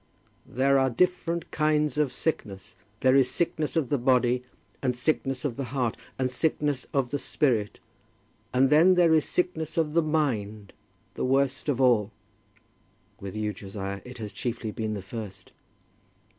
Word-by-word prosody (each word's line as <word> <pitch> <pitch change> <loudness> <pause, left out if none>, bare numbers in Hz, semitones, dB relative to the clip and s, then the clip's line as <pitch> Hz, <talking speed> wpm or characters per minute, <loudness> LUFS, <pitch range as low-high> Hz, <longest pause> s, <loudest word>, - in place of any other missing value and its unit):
"There 135 +2 +2
are 135 0 +3
different 170 +4 0
kinds 150 -2 +1
of 145 -4 +2
sickness. 105 -9 -4 0.3
There 130 0 +5
is 135 -2 +4
sickness 160 -3 -1
of 155 -7 +1
the 145 - +1
body, 125 0 +2 0.4
and 125 -2 0
sickness 135 0 -1
of 125 -5 -2
the 135 - -2
heart, 125 -2 -1 0.2
and 130 - +1
sickness 145 0 -1
of 135 -3 0
the 145 - -1
spirit; 125 -7 0 0.7
and 130 +2 +3
then 170 +5 +6
there 170 -2 +5
is 155 -2 +3
sickness 160 -3 -2
of 155 -2 +1
the 170 - +4
mind, 110 -10 -1 0.4
the - - -4
worst 135 +2 +1
of 135 -3 0
all." 120 -6 +4 1.1
"With 100 +1 -7
you, 105 -1 -2
Josiah, 100 0 -6
it 125 0 -10
has 105 -4 -6
chiefly 115 -1 -4
been 110 0 -3
the 100 - -6
first." 105 0 -8
130 Hz, 155 wpm, -27 LUFS, 115-150 Hz, 1.1 s, then